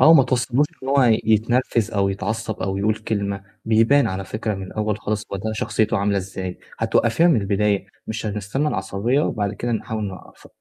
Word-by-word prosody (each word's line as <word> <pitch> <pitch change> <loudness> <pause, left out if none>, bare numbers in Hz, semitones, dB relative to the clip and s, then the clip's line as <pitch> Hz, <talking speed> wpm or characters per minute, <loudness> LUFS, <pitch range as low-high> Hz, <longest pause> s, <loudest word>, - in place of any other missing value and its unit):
آه، - - +7
وما 160 -4 +8
توصليهوش 130 +2 +1 0.2
إن 130 - -5
هو 140 0 +4
ي 115 -3 +4
يتنرفز 115 +1 +2
أو 100 -2 +1
يتعصّب 110 +3 -3
أو 95 0 -1
يقول 105 +2 +1
كلمة، 100 -3 -3 0.2
بيبان 115 +6 +4
على 95 +1 -3
فكرة 110 +1 -3
من 95 - -6
الأول 105 +1 -2
خالص 105 0 -2
هو - - 0
ده 110 +3 -3
شخصيته 110 0 0
عاملة 100 0 +1
إزاي، 95 -1 -4 0.2
هتوقّفيها 115 +9 +3
من 145 -10 +4
البداية 100 0 +1 0.2
مش 110 0 -4
هنستني 105 +8 -1
العصبيّة 100 +5 0
وبعد 105 -8 -1
كده 120 +4 -2
نحاول 110 -1 -2
نوقف 95 -2 -9
110 Hz, 185 wpm, -22 LUFS, 100-115 Hz, 0.2 s, وما